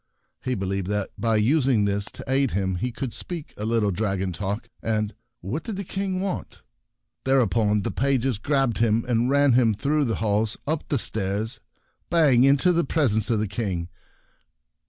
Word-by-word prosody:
He 130 -1 -1
believed 95 -1 -2
that 105 -1 -2
by 115 -1 +1
using 125 0 +3
this 100 0 0
to - - -6
aid 135 0 +2
him 95 -3 -1
he 125 +7 -2
could 125 0 -5
speak 170 -4 -7
a 105 - -5
little 110 -2 +1
dragon 95 -2 -1
talk, 100 +5 -3
and 110 -1 -1
— 120 0 -54
what 115 - -3
did 220 - -4
the 200 - -3
King 190 0 -2
want? 195 -1 -4 0.6
Thereupon 110 -5 +2
the - - -2
pages 135 -4 0
grabbed 135 -4 +1
him, 115 0 +2
and 120 0 +1
ran 140 -1 +4
him 115 -3 +4
through 145 +7 +1
the 115 -3 0
halls, 105 0 0
up 155 +1 -2
the 145 - +1
stairs, 110 +1 -2 0.5
bang 150 -8 +5
into 140 +6 +5
the 170 0 +2
presence 115 -10 +2
of 115 -3 +2
the 110 - 0
King. 95 -4 -3
115 Hz, 175 wpm, -24 LUFS, 105-135 Hz, 0.6 s, bang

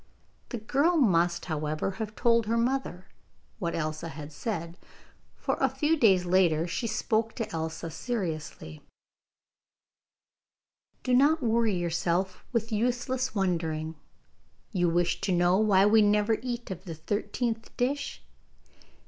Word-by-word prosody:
The 240 - -3
girl 285 +10 +2
must, 175 - +2
however, 155 +2 -2
have 215 0 -4
told 230 -2 +3
her 230 +1 +1
mother 235 -6 -1 0.5
what 170 -4 -2
Elsa 155 0 -3
had 150 -1 -8
said, 170 -1 -4 0.6
for - - -2
a - - +3
few 310 +1 +1
days 195 - +4
later 175 -3 +3
she 180 +7 -2
spoke 225 0 0
to 230 - -3
Elsa 160 0 -4
seriously: 160 - -4 2.2
'Do 255 - 0
not 285 +4 +4
worry 225 -3 +2
yourself 175 +2 -1
with 230 -1 -1
useless 245 +3 -1
wondering. 165 -5 -1 0.8
You 175 -5 +2
wish 175 +1 +1
to 195 - 0
know 175 +1 +3
why 200 -3 +5
we 215 +1 +6
never 210 +1 +3
eat 240 -3 -4
of 185 +1 -7
the 165 -3 -6
thirteenth 220 +7 -2
dish? 275 +3 -2
205 Hz, 130 wpm, -28 LUFS, 170-235 Hz, 2.2 s, we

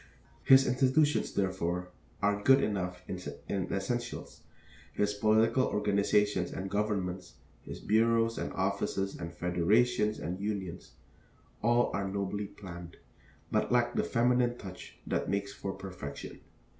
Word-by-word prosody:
His 135 0 +7
institutions, 135 +4 +2
therefore, 90 -2 -1 0.3
are 105 0 +2
good 135 +5 +5
enough 90 -3 -2
in 95 - -4 0.5
essentials; 120 +4 -3 0.5
his 105 0 +1
political 110 +4 +3
organizations 105 -2 +1
and 95 0 -5
governments, 95 -4 -2 0.3
his - - -8
bureaus 115 +1 +2
and - - -3
offices 100 0 -1
and 85 -1 -6
federations 105 +7 +2
and 90 +4 -4
unions, 100 -4 -4 0.7
all 120 +2 +3
are 100 0 -1
nobly 100 +1 -2
planned, 85 -4 -10 0.5
but - - +1
lack 120 -1 +3
the - - +1
feminine 120 0 +2
touch 95 -4 -10
that - - -1
makes 100 0 -1
for 95 - -4
perfection. 90 -8 -8
100 Hz, 120 wpm, -31 LUFS, 95-115 Hz, 0.7 s, His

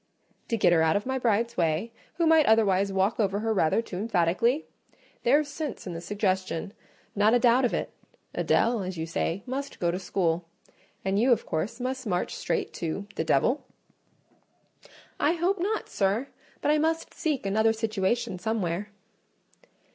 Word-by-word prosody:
"To 230 - 0
get 175 - +4
her 165 - +4
out 160 0 +3
of 205 - 0
my 265 0 -1
bride's 235 0 +1
way, 170 +5 0 0.2
who 340 - +1
might 320 -2 +5
otherwise 200 -3 +3
walk 195 +4 +1
over 200 -1 +1
her 225 0 0
rather 190 +3 +2
too 180 - -7
emphatically? 215 - +1 0.6
There's 285 +5 +3
sense 290 -2 -5
in 180 - -5
the 165 - -6
suggestion; 190 -2 -2 0.4
not 210 +3 +4
a - - +4
doubt 245 +1 +4
of 240 - 0
it. - - -3 0.4
Adèle, 230 -3 +2
as 185 -1 -5
you 160 - -2
say, 165 +3 -2
must 275 +2 -5
go 170 -1 +1
to 180 - -3
school; 175 -3 -1 0.6
and 195 +1 +1
you, 250 +4 +4
of 235 - +2
course, 195 +9 -3
must 260 0 -3
march 180 -3 -1
straight - - -2
to—the 190 +2 -4
devil?" 235 - +1 1.5
"I 300 - +3
hope 355 +3 0
not, 420 +5 -1
sir; 205 +7 0 0.3
but 295 - +2
I 305 - +3
must 320 +1 -1
seek 295 -9 -2
another 220 +3 +3
situation 220 -3 -1
somewhere." 205 -2 -2
215 Hz, 165 wpm, -27 LUFS, 185-250 Hz, 1.5 s, might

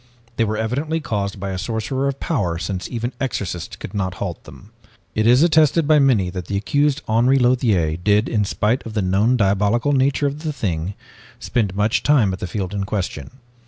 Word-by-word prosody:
They 115 - +2
were 110 0 -2
evidently 140 +9 -1
caused 100 -8 -3
by 100 0 -4
a 95 - -4
sorcerer 115 +6 -2
of 140 0 -3
power 95 - -1
since 90 +3 -4
even 120 +1 -3
exorcists 95 -10 -3
could - - -9
not 95 -3 -2
halt 90 -2 -5
them. 100 - -14 0.4
"It 110 +1 +1
is 125 +5 +6
attested 160 -1 +4
by 155 -1 +5
many 115 -10 +3
that 90 -1 -6
the 100 - -1
accused, 145 +7 +1
Henri 120 +5 +3
Lothiere, 115 -11 +2
did 105 +4 +2
in 105 -3 +1
spite 105 +5 0
of 110 - -8
the 105 - +1
known 100 +7 +2
diabolical 105 +6 +2
nature 135 +1 +2
of 140 +1 -2
the 155 -1 -2
thing, 95 - -3 0.4
spend 105 -6 -1
much 105 +2 +1
time 125 -10 +3
at 95 - -6
the - - -4
field 95 +1 -4
in 100 -1 -2
question. 95 -1 -4
110 Hz, 195 wpm, -21 LUFS, 95-130 Hz, 0.4 s, is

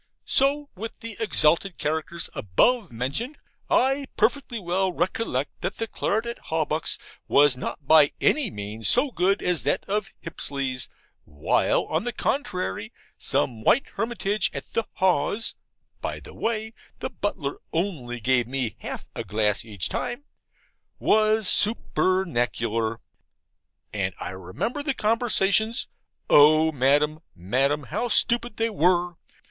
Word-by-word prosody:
So 285 +2 +3
with 220 +4 -7
the 230 -2 -6
exalted 180 -4 +3
characters 160 +3 0
above 200 - +2
mentioned. 140 - -2 0.3
I 270 +2 +2
perfectly 240 +1 +1
well 185 +1 0
recollect 175 - -2
that - - -2
the 225 - -2
claret 220 0 -1
at 235 0 -5
Hawbuck's 155 -1 0 0.3
was 145 -2 +5
not 140 +3 -6
by 155 -2 +6
any 290 -7 +2
means 105 - -3
so 260 +3 +3
good 195 -1 +1
as 180 -3 +1
that 190 - 0
of 200 0 -2
Hipsley's, 135 -6 -3 0.3
while, 75 0 +1
on 160 +4 -1
the 245 0 -3
contrary, 180 - -2 0.2
some 115 -4 -1
white 270 - +3
hermitage 215 -1 0
at - - -7
the 230 - 0
Haws 190 +4 +1 0.5
(by - - -4
the - - -12
way, 220 -1 -2 0.2
the - - -5
butler 145 -9 -3
only 155 -9 -2
gave 125 +1 +2
me 125 -4 -3
half - - -7
a - - -4
glass 105 -1 0
each 105 -6 -3
time) 245 +4 -4 0.7
was 215 -1 +2
supernacular. 120 - +1 0.9
And 95 -3 -2
I - - -5
remember 95 - -4
the 280 -2 -2
conversations. 220 -1 +2 0.4
O 155 +2 +6
Madam, 145 +2 +2 0.2
Madam, 135 +11 0
how 200 - -2
stupid 235 -1 +2
they 230 0 0
were! 175 -2 +1
175 Hz, 130 wpm, -25 LUFS, -, 0.9 s, by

